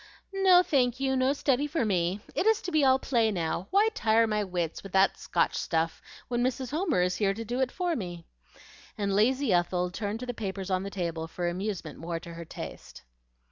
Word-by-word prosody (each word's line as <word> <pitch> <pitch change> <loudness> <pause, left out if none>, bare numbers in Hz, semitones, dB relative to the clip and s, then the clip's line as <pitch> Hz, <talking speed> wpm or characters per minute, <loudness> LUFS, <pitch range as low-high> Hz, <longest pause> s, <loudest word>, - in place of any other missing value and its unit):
"No, 375 -2 +6
thank 255 -6 +1
you; 265 -1 +1
no 260 +1 +3
study 280 0 +1
for 295 -4 0
me. 185 0 0
It 410 - 0
is 445 -1 +4
to 360 - -4
be 310 -3 +3
all 265 -1 +5
play 235 -4 +1
now. 175 -1 -2
Why 415 +3 +4
tire 225 - +3
my 210 -1 0
wits 175 -4 -3
with 195 - -11
that 195 0 +4
Scotch - - 0
stuff 165 0 -1 0.3
when 240 0 0
Mrs. 255 0 -2
Homer 315 - +1
is 180 0 0
here 195 -2 +1
to 230 +2 -5
do 245 +3 -3
it 260 -1 +1
for 355 -2 -1
me?" 175 - -6 0.7
and 200 -2 -1
lazy 245 +3 +3
Ethel 180 0 +1
turned 205 +3 -3
to - - -4
the 245 - -4
papers 195 -3 -4
on 185 0 +1
the 200 - -4
table 170 -4 -3
for 175 +1 -3
amusement 180 -3 -4
more 165 0 -4
to 170 0 -10
her 170 0 -8
taste. - - -9
210 Hz, 215 wpm, -28 LUFS, 180-265 Hz, 0.7 s, No